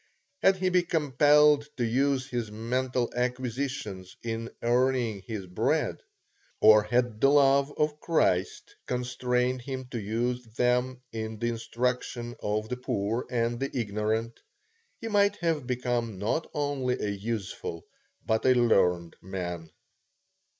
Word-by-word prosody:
Had 195 - +5
he 185 0 0
been 180 -1 +2
compelled 150 -1 +4
to 120 - +1
use 135 +3 +1
his 120 -5 -3
mental 125 +3 -1
acquisitions 125 -6 -3
in 115 0 -3
earning 120 -3 +1
his 105 -4 -4
bread, 90 0 0 0.6
or 110 -1 +8
had 120 0 0
the 135 - +6
love 140 0 +4
of 150 0 0
Christ 95 - 0
constrained 125 0 0
him 130 0 -5
to 120 - -3
use 120 +4 -1
them 125 +1 +1
in 110 0 -5
the 120 +2 -1
instruction 120 +1 -2
of 105 +1 -1
the 125 - -3
poor 115 -2 -2
and 120 -1 0
the 135 +1 -1
ignorant, 110 +1 -1 0.6
he 225 - -5
might 205 -1 +3
have 165 -8 -1
become 120 -4 -1
not 110 - -1
only 140 -4 -1
a 105 - -1
useful, 100 -5 -4 0.4
but 110 0 +1
a 130 - +6
learned 90 -8 +2
man. 90 -3 -5
125 Hz, 130 wpm, -28 LUFS, 110-130 Hz, 0.6 s, or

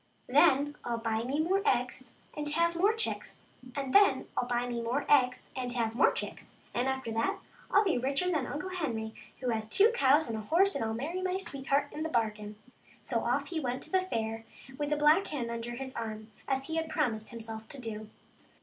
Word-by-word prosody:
Then 285 +1 +4
Til 235 -1 -1
buy 225 -1 -1
me 275 +4 -1
more 370 +5 +2
eggs 250 - 0 0.2
and 295 0 -2
have 335 +3 +2
more 390 +5 +4
chicks, 450 +1 -3 0.3
and 275 -2 -3
then 405 0 +5
Til 245 - 0
buy 245 0 0
me 240 -1 -2
more 245 +5 -1
eggs 255 -3 +3
and 250 -2 -3
have 230 -2 0
more 240 - +5
chicks, - - -4 0.2
and 245 +2 0
after 265 -3 -2
that 225 +1 0 0.3
I'll 410 - +5
be 365 -10 +1
richer 275 +8 +1
than 300 -7 0
Uncle 300 +6 -4
Henry, 230 -11 -3 0.3
who 255 - -1
has 220 -2 -1
two 420 - +5
cows 295 - +4
and 225 - -3
a 220 - -3
horse, 365 - +3
and - - -1
will 220 0 -1
marry 320 +10 -3
my 370 0 0
sweetheart 280 -6 -1
into 305 - -6
the 320 - -1
bargain." 215 -4 -1 0.5
So 235 - 0
off 275 +5 0
he 335 -3 -2
went 255 -3 -2
to - - -7
the 375 -1 +4
fair 225 -10 -3 0.3
with 290 +1 -2
the 300 - +1
black 300 +6 +5
hen 245 -6 -3
under 235 +1 -4
his 265 +1 -6
arm, 220 -1 -5 0.2
as 270 0 0
he 320 +2 -3
had 320 0 -1
promised 230 -9 0
himself 225 -2 -8
to 280 - -7
do. 215 -3 -6
265 Hz, 215 wpm, -31 LUFS, 230-315 Hz, 0.5 s, then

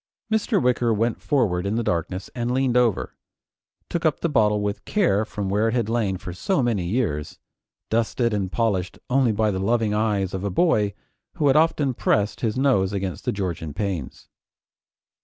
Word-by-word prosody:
Mr. 220 -1 +2
Wicker 125 -4 +2
went 115 +1 0
forward 105 -12 +1
in 100 +2 -1
the 120 - 0
darkness 90 0 -2
and 120 -1 -2
leaning 130 -1 +1
over, 120 -5 +2 0.7
took 170 - -3
up 155 -3 +1
the 170 - +1
bottle 105 -7 +3
with 105 0 -3
care 170 - +2
from 105 -2 -4
where 105 +3 +1
it 115 - 0
had 115 -3 0
lain 110 -5 0
for 90 - -7
so 140 - 0
many 110 -7 0
years, 85 - -2 0.5
dusted 115 +1 +1
and 95 -3 -1
polished 100 -6 -1
only 130 -3 +3
by 110 0 +1
the 95 - -2
loving 110 +1 +1
eyes 105 -3 0
of 95 0 -3
a 100 - -1
boy 105 - +2 0.4
who 160 -6 -1
had 135 - +4
often 150 -4 +3
pressed 105 -3 0
his 115 0 -1
nose 115 -8 +2
against 95 -5 -4
the - - +1
Georgian 85 -6 -4
panes. 95 -10 -4
110 Hz, 180 wpm, -23 LUFS, 95-125 Hz, 0.7 s, had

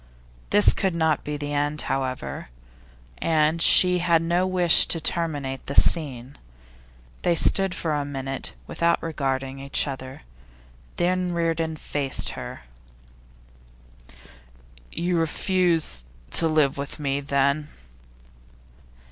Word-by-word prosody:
This 205 0 +5
could 190 -3 -2
not 160 -2 0
be 150 0 -4
the 145 0 -5
end, 145 +1 -1
however, 130 - -4 0.7
and 160 0 +1
she 180 +1 +5
had 170 -2 +2
no 175 +2 0
wish 180 -2 +5
to 165 - +1
terminate 145 -5 -2
the 140 - -4
scene. 135 -5 +2 0.8
They 170 - +1
stood 195 +2 +3
for 160 -2 -2
a 145 -1 -1
minute 135 - -5
without 170 - 0
regarding 135 -4 -3
each 140 0 0
other, 130 -1 -8 0.7
then 180 0 -1
Reardon 165 -1 -1
faced 145 -3 0
to - - -6
her. - - -8 2.3
'You 175 +1 -1
refuse 165 - 0 0.3
to 165 - +5
live 150 -3 +1
with 140 0 -6
me, 140 -1 -2
then? 140 +1 0
155 Hz, 115 wpm, -24 LUFS, 140-170 Hz, 2.3 s, This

